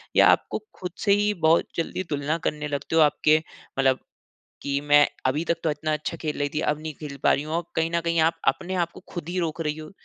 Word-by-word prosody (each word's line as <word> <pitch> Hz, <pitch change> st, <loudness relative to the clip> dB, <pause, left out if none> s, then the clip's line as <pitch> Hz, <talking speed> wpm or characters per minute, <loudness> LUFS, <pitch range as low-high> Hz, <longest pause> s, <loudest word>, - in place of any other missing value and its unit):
या -, -, +7 dB
आपको -, -, +3 dB, 0.2 s
ख़ुद 180 Hz, -1 st, -4 dB
से 200 Hz, -, +4 dB
ही 205 Hz, +1 st, +2 dB
बहुत 160 Hz, +1 st, +5 dB
जल्दी 170 Hz, +2 st, -2 dB
तुलना 145 Hz, +2 st, -1 dB
करने 150 Hz, 0 st, -2 dB
लगते 145 Hz, +2 st, -3 dB
हो? 165 Hz, -, +6 dB
आपके 155 Hz, +1 st, +4 dB, 0.4 s
मतलब 135 Hz, -1 st, +3 dB, 0.6 s
कि 140 Hz, 0 st, -1 dB
मैं 145 Hz, 0 st, +5 dB, 0.2 s
अभी 145 Hz, +5 st, 0 dB
तक 170 Hz, 0 st, +1 dB
तो 160 Hz, -, +3 dB
इतना 155 Hz, +1 st, -2 dB
अच्छा 150 Hz, +2 st, -3 dB
खेल 155 Hz, -2 st, -4 dB
रही 145 Hz, 0 st, 0 dB
थी। -, -, 0 dB
अब 150 Hz, 0 st, 0 dB
नहीं 155 Hz, -1 st, -6 dB
खेल 145 Hz, -2 st, -6 dB
पा -, -, +5 dB
रही 140 Hz, -, 0 dB
हूँ। 155 Hz, +2 st, -5 dB
और 170 Hz, -, 0 dB
कहीं 165 Hz, 0 st, +1 dB
न 170 Hz, -, +3 dB
कहीं 170 Hz, 0 st, +1 dB
आप 160 Hz, +1 st, +2 dB
अपने 190 Hz, 0 st, 0 dB
आप 170 Hz, -, -16 dB
को -, -, -12 dB
ख़ुद 170 Hz, -3 st, -5 dB
ही 180 Hz, +1 st, -2 dB
रोक 165 Hz, -1 st, -2 dB
रही 150 Hz, -1 st, -2 dB
हो। 155 Hz, 0 st, -9 dB
155 Hz, 250 wpm, -25 LUFS, 150-170 Hz, 0.6 s, या